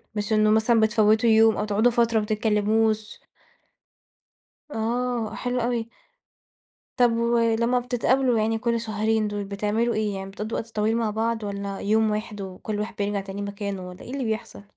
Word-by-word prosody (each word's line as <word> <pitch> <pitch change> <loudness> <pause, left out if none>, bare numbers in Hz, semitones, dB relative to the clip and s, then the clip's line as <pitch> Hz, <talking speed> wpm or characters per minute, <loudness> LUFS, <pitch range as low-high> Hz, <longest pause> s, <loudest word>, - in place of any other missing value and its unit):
مش 210 +1 -1
إنه 215 0 +4
مثلًا 220 +2 +3
بتفوتوا 220 +1 +3
يوم 220 0 +5
أو 210 - -1
تقعُدوا 215 +3 +2
فترة 230 -1 +2
ما - - -2
بتتكلَّموش. 215 0 0 1.5
آه، 235 -1 -2
حلو 250 0 -2
أوي. 235 -1 -1 1.1
طب 245 -1 +5
ولمّا 235 +1 +2
بتتقابَلوا 250 0 +1
يعني 220 +1 +1
كل 235 0 -1
شهرين 220 0 0
دول، 205 0 -3
بتعمَلوا 210 +4 -1
إيه 210 -2 -1
يعني؟ 195 0 -6
بتقضُّوا 215 +3 -4
وقت 225 - -6
طويل 220 +2 +1
مع 230 -2 0
بعض 225 +1 -1
والّا 200 -1 -4
يوم 220 +1 +2
واحد 210 -1 -4
وكل 195 +2 -5
واحد 210 - -4
بيرجَع 205 0 -1
تاني 195 +1 -7
مكانه، 200 -2 -5
والّا 180 +1 -12
إيه - - -9
اللي 275 - -2
بيحصَل؟ 220 -2 -4
220 Hz, 165 wpm, -24 LUFS, 210-230 Hz, 1.5 s, يوم